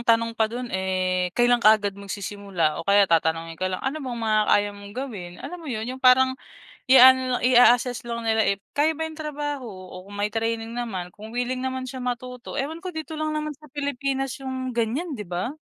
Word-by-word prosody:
tanong 230 0 +3
pa 220 -1 +1
do'n 240 +1 -6
eh, 185 -1 0
kailan 240 0 +4
ka 215 0 +7
agad 205 -2 -3
magsisimula? 200 -4 -3
O 165 - -10
kaya 200 0 +6
tatanungin 165 -1 +1
ka 185 - +1
lang 185 0 -5
ano 280 +4 -2
bang 255 -4 -4
mga 220 -2 +2
kaya 205 0 +4
mong 200 0 -11
gawin? 210 -10 -5
Alam 355 - -6
mo 320 - -9
'yon? 220 -4 -3
'Yong 255 +2 -6
parang 260 0 +6 0.5
i-aano 260 0 +8 0.2
lang, - - -10
i-a-asess 245 0 +5
lang 235 -1 -4
nila 220 -1 +3
if 200 0 0 0.2
kaya 305 +2 +3
ba 320 +1 -3
'yong 315 - -11
trabaho, 295 -3 -4
o 185 -4 -9
kung 205 +1 -8
may 205 - +1
training 225 +1 -2
naman 200 -7 -4
kung 215 +2 -10
wiling 250 +1 -2
naman 260 0 -3
siya 260 - -7
matuto. 250 +1 -4
Ewan 300 +4 -4
ko 365 - -4
dito 315 0 -6
lang 310 0 -2
naman 305 -1 -3
sa 305 - -21
Pilipinas 275 -2 -2
'yong 260 -2 -5
ganyan, 260 +7 -1
'di 210 - -6
ba? 180 - -4
240 Hz, 210 wpm, -24 LUFS, 205-265 Hz, 0.5 s, i-aano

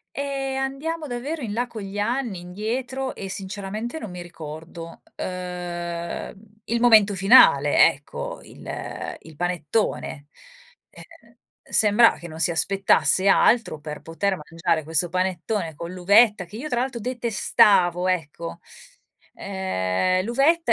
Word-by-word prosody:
Ehm, 275 -1 -3
andiamo 300 +4 -3
davvero 275 +4 -4
in 215 - -4
là 240 +3 -1
con 225 -3 -8
gli 195 +1 -7
anni, 230 -3 -1
indietro, 240 +8 -4
e 195 - -7
sinceramente 205 +7 -5
non 215 - -7
mi 180 0 -7
ricordo, 165 0 -10
uhm, 175 -2 -5 0.3
il 235 +1 -1
momento 215 -4 +6
finale, 190 - +6
ecco, 140 +1 -8
il - - -7
il 160 -1 -15
panettone. 170 -3 -2 0.6
Eh, - - -13 0.2
ehm, - - -24 0.3
sembra 220 +2 +4
che 170 - -9
non 160 0 -9
si 175 - +2
aspettasse 195 +2 +2
altro 225 -3 +3
per 150 0 -7
poter 190 +4 -2
mangiare 165 0 -1
questo 165 +3 +1
panettone 185 -1 -2
con 170 +4 -7
l'uvetta 205 +2 +4
che 195 +5 -11
io, 280 +7 -5
tra 245 -4 0
l'altro, 255 -2 -3
detestavo 205 -6 +2
ecco. 170 -1 -3 0.8
Uhm, 185 - -1
l'uvetta 280 +9 +2
195 Hz, 130 wpm, -23 LUFS, 170-235 Hz, 0.8 s, momento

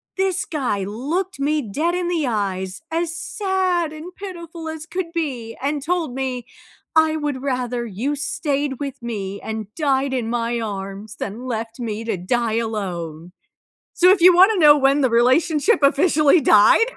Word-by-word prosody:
this 380 0 0
guy 250 - -2
looked 290 - -3
me 300 +2 +1
dead 295 - -1
in 360 -1 -1
the 340 -4 0
eyes, 195 -3 -2
as 330 0 -1
sad 370 -5 -1
and 320 +4 -9
pitiful 340 -4 -7
as 315 -1 -6
could 360 -1 -4
be 255 -9 -3
and 285 +1 -1
told 335 -4 -1
me, 255 -2 -3 0.5
"I 315 0 +4
would 295 -4 -3
rather 250 -3 -2
you 235 +7 -2
stayed 285 -2 -2
with 275 -3 -5
me 200 -4 -5
and 220 -1 -6
died 275 -3 +1
in 240 -3 -2
my 235 0 -1
arms, 200 0 -6
than 230 +6 -6
left 230 0 -4
me 225 -1 -4
to 225 - -1
die 225 +5 -1
alone." 180 -7 -4 0.6
So, 360 +1 +5
if 380 -1 +4
you 360 +1 +8
wanna 385 +4 +6
know 300 -3 +7
when 275 0 +3
the 260 - +3
relationship 290 - +3
officially 300 +2 +4
died? 455 - +5
275 Hz, 165 wpm, -21 LUFS, 225-330 Hz, 0.6 s, you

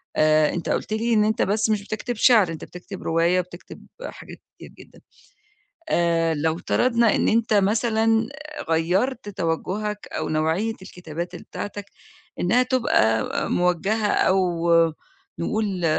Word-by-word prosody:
آآ 155 0 +3
أنت 175 - -4
قُلت 215 - -1
لي 230 +2 0
إن 210 -1 +4
أنت 220 +2 0
بس 215 +2 +1
مش 210 -2 0
بتكتب 215 +4 -4
شِعر، 215 -5 +5
أنت 160 - -7
بتكتب 180 +2 -10
رواية 170 +2 +2
وبتكتب 180 0 -9 0.2
حاجات - - -10
كتير - - -12
جدًا. - - -16 0.9
آآ 165 - +1
لو 160 +2 0
افترضنا 235 +4 +2
إن - - +1
أنت 225 0 +2
مثلًا 225 +2 +2 0.4
غيَّرت 190 +9 0
توجهك 205 +3 -3
أو - - -3
نوعية 160 +8 0
الكتابات 175 -1 -7
بتاعتك 205 +3 -7 0.6
إنها 235 +8 +3
تبقى 170 - +2 0.3
موجهة 190 +5 +1
أو 175 -3 +1 0.7
نقول 200 -5 -2
195 Hz, 130 wpm, -23 LUFS, 170-220 Hz, 0.9 s, شِعر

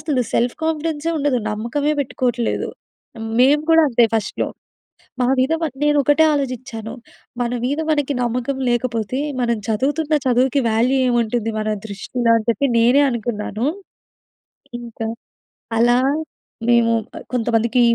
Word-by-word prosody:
అసలు 275 -6 0
సెల్ఫ్ 240 +1 +1
కాన్ఫిడెన్సే 320 0 -1
ఉండదు. 280 -4 +1
నమ్మకమే 245 +8 -1
పెట్టుకోట్లేదు. 250 -3 -1 0.7
మేము 290 +4 +5
కూడా 325 0 +6
అంతే, 235 0 +4
ఫస్ట్‌లో 210 -3 -1 0.7
మా 250 - +2
మీద 265 +5 +2 0.3
నేనొకటే 295 +1 +4
ఆలోచిచ్చాను. 250 -5 -4 0.5
మన 240 0 -1
మీద 285 +4 -1
మనకి 290 -2 +1
నమ్మకం 250 +3 -2
లేకపోతే, 240 0 -1 0.2
మనం 235 -2 +1
చదువుతున్న 290 +8 0
చదువుకి, 255 +2 +2
వాల్యూ 245 +5 +2
ఏముంటుంది 235 -1 0
మన 215 - -2 0.2
దృష్టిలో? 230 +4 -2
అని 215 - -4
చెప్పి, 280 +4 +1
నేనే 245 +5 +5
అనుకున్నాను. 225 -1 -3 1.1
ఇంక 235 -2 -11 0.8
అలా, 240 +1 +4 0.7
మేము 235 -1 +4 0.2
అ - - -4 0.2
కొంతమందికి, 235 +1 +1
245 Hz, 115 wpm, -20 LUFS, 230-280 Hz, 1.1 s, కూడా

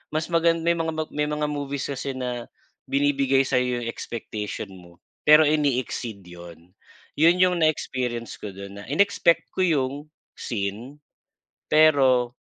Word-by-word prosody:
mas 160 +2 -2
magan 165 0 +2
may 170 - +3
mga 165 -1 -2 0.2
may 150 0 -1
mga 150 0 -2
movies 140 -1 -4
kasi 135 0 -4
na 125 -2 -4 0.4
binibigay 135 -1 +2
sa'yo 125 -2 0
yung - - -5
expectation 105 -3 -6
mo 85 -1 -17 0.3
pero 150 +1 +8
ine-exceed 130 -8 -1
yun. 85 -1 -13 0.5
Yun 170 +3 +5
yung 180 -1 +3
na 160 - +4
experience 125 -6 -3
ko 100 -3 -8
dun 100 +1 -9
na 100 - -11
inexpect 170 +2 +2
ko - - -8
yung 140 -7 +1 0.5
scene 115 +7 -5 0.6
pero 135 -6 +4
135 Hz, 140 wpm, -24 LUFS, 115-155 Hz, 0.6 s, pero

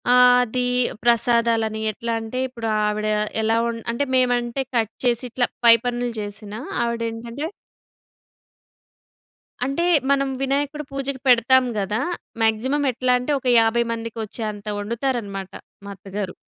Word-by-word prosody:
ఆ! - - +6 0.3
అది 250 +1 -1 0.4
ప్రసాదాలని 230 -2 +2
ఎట్లా 230 +2 -4
అంటే 225 +3 -6
ఇప్పుడు 235 -3 -6 0.2
ఆవిడ 210 0 -1 0.4
ఎలా 220 +1 +2
వం 235 0 -1 0.2
అంటే, 235 +4 -1
మేమంటే 245 0 +1
కట్ 225 -2 +1
చేసి 240 0 +2
ఇట్లా 245 +1 +1 0.2
పై 230 - +10
పనులు 245 0 -1
జేసినా, 205 +1 -5 0.2
ఆవిడేంటంటే 235 +2 -4 2.2
అంటే 275 +6 0 0.3
మనం 275 -1 +2
వినాయకుడి 285 +2 -1
పూజకి 275 -1 -4
పెడతాం 255 +1 +5
గదా! 205 +2 -1 0.4
మాక్సిమమ్ 260 +6 +1
ఎట్లా 250 +1 +1
అంటే 250 +4 -3
ఒక 260 - -6
50 225 +1 +3
మందికొచ్చేంత 220 -2 -5
ఒండుతారన‌మాట 215 -4 -3 0.3
మా 200 - -7
అత్తగారు. 195 0 -5
235 Hz, 120 wpm, -22 LUFS, 220-255 Hz, 2.2 s, పై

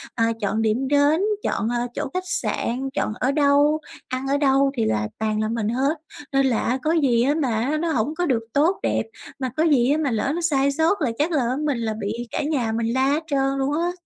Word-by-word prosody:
ờ, 230 - +2 0.2
chọn 215 +2 0
điểm 225 +5 0
đến, 290 +4 +3 0.2
chọn, 220 - -1
ờ, 240 0 -1
chỗ - - -3
khách 365 0 -2
sạn, 270 -6 -2
chọn 215 - -1
ở 265 - +1
đâu, 290 +1 +3 0.3
ăn 255 +1 -3
ở 280 +1 +2
đâu, 275 -1 +3
thì 225 - +1
là 105 -1 0
toàn 215 -1 0
là 215 - 0
mình 225 -2 -1
hết. 270 +7 0 0.4
Nên 270 0 +3
là 245 -4 +2
á, 250 +2 0
có 310 - +1
gì, 265 -8 +3
á, 285 +3 +2
mà 255 +3 0
nó 335 +1 -1
hổng 250 +2 0
có 355 - 0
được 240 -7 0
tốt 320 +7 +2
đẹp, - - +1 0.4
mà 260 -1 -2
có 315 - +3
gì, 275 -6 +3
á, 295 - +2
mà 290 -5 0
lỡ 225 +5 0
nó 345 - -2
sai 280 -4 +2
sót 325 +6 +1
là 255 -6 +1
chắc 315 +4 +1
là, 295 - +2
ờ, 250 +2 -1
mình 285 -5 0
là 225 -2 -2
bị 205 +2 -2 0.2
cả - - -2
nhà 265 -7 0
mình 230 +1 -1
la 260 +1 +2
hết 295 +4 +1
trơn 275 -2 0
luôn 275 +2 0
á. 340 +3 0
270 Hz, 250 wpm, -23 LUFS, 235-295 Hz, 0.4 s, đến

